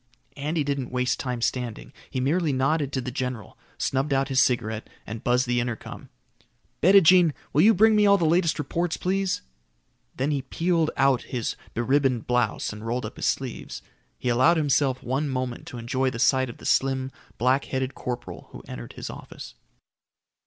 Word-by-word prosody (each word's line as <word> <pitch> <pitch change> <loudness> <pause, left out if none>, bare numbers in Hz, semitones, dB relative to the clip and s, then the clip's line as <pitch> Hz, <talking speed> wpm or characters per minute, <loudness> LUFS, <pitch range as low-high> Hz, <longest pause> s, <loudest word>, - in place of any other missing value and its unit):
Andy 150 +2 -1
didn't 140 -3 -2
waste 125 0 0
time 125 -3 -3
standing. 125 -4 -3 0.2
He 130 - -3
merely 155 +5 +1
nodded 140 +2 +1
to 130 - 0
the 125 - -5
general, 125 -4 -4 0.2
snubbed 135 +2 0
out 135 0 +1
his 130 -1 +4
cigarette, 110 -3 0 0.2
and 110 +2 -7
buzzed 125 +1 +2
the 120 0 +1
intercom. 120 -1 -5 0.7
"Bettijean, 180 -2 +6 0.2
will 150 - +4
you 220 +5 +6
bring 220 +3 +5
me 210 -1 +5
all 200 0 +6
the 170 - 0
latest 165 0 +2
reports, 165 +3 -2
please?" 190 - -1 0.7
Then 140 +3 0
he 140 -2 0
peeled 165 +3 0
out 135 -2 +3
of - - -19
his 120 -3 -2 0.2
be 120 - 0
ribboned 130 -2 +1
blouse 125 -4 0
and 105 0 -9
rolled 120 +1 -2
up 110 - -7
his - - -1
sleeves. 130 -3 -3 0.3
He 125 - -2
allowed 130 +8 +4
himself 140 -3 +1
one 135 +4 -1
moment 130 -2 -3
to 125 - -7
enjoy 130 +3 0
the 120 - -6
sight 130 +1 +3
of 120 - -9
the - - -13
slim, 135 0 +1 0.3
black 130 +4 +2
headed 130 0 -2
corporal 120 -9 -6
who - - -10
entered - - -8
his - - -6
office. - - -10
130 Hz, 180 wpm, -25 LUFS, 125-150 Hz, 0.7 s, Bettijean